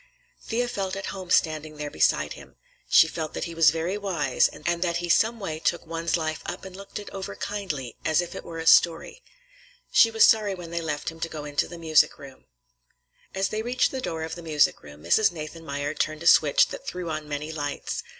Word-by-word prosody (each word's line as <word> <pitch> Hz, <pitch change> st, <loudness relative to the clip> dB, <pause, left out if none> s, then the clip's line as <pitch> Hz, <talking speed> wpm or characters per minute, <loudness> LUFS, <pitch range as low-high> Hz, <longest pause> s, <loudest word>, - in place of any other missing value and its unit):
Thea 245 Hz, +2 st, -1 dB
felt 195 Hz, -5 st, -3 dB
at 195 Hz, 0 st, -5 dB
home 190 Hz, -2 st, -8 dB
standing 155 Hz, -3 st, +1 dB
there 150 Hz, -1 st, -5 dB
beside 80 Hz, -, +1 dB
him; -, -, -14 dB, 0.3 s
she -, -, +7 dB
felt 160 Hz, -1 st, -5 dB
that -, -, -3 dB
he 170 Hz, -, -5 dB
was 165 Hz, -2 st, +6 dB
very 165 Hz, +6 st, -2 dB
wise, 165 Hz, -10 st, +1 dB
and -, -, -13 dB, 0.2 s
that 170 Hz, -2 st, 0 dB
he 175 Hz, 0 st, -4 dB
some 225 Hz, +6 st, +3 dB
way 160 Hz, -6 st, -4 dB
took 170 Hz, +1 st, -1 dB
one's 165 Hz, +1 st, -1 dB
life 155 Hz, -1 st, -3 dB
up 180 Hz, +2 st, -6 dB
and 190 Hz, -1 st, -9 dB
looked 200 Hz, +1 st, -9 dB
it 210 Hz, -, -8 dB
over 195 Hz, -1 st, -6 dB
kindly, 170 Hz, -, -4 dB
as 160 Hz, 0 st, +2 dB
if 175 Hz, -1 st, -2 dB
it -, -, -7 dB
were 165 Hz, -, -8 dB
a 165 Hz, -, -5 dB
story. 170 Hz, -, +4 dB, 0.7 s
She 225 Hz, -, +6 dB
was 225 Hz, 0 st, +5 dB
sorry 210 Hz, -3 st, +3 dB
when 175 Hz, -2 st, -9 dB
they 170 Hz, 0 st, -2 dB
left 150 Hz, -3 st, -3 dB
him 165 Hz, 0 st, -11 dB
to 165 Hz, -, -3 dB
go 150 Hz, -2 st, -7 dB
into 145 Hz, 0 st, -1 dB
the 175 Hz, -, -9 dB
music 160 Hz, -2 st, +3 dB
room. 135 Hz, -2 st, -13 dB, 0.9 s
As 195 Hz, 0 st, 0 dB
they 215 Hz, -, -2 dB
reached 245 Hz, +3 st, +1 dB
the 265 Hz, -, -4 dB
door 160 Hz, -8 st, -3 dB
of 160 Hz, -, -5 dB
the 175 Hz, -, -7 dB
music 155 Hz, -3 st, +2 dB
room, 75 Hz, +1 st, -13 dB
Mrs. 205 Hz, -, +4 dB
Nathanmeyer 155 Hz, -3 st, -5 dB
turned 155 Hz, +1 st, -2 dB
a -, -, -8 dB
switch -, -, +5 dB
that -, -, -9 dB
threw 180 Hz, -1 st, -4 dB
on 155 Hz, -1 st, -5 dB
many 150 Hz, +2 st, -4 dB
lights. 145 Hz, -2 st, -4 dB
165 Hz, 220 wpm, -25 LUFS, 155-190 Hz, 0.9 s, she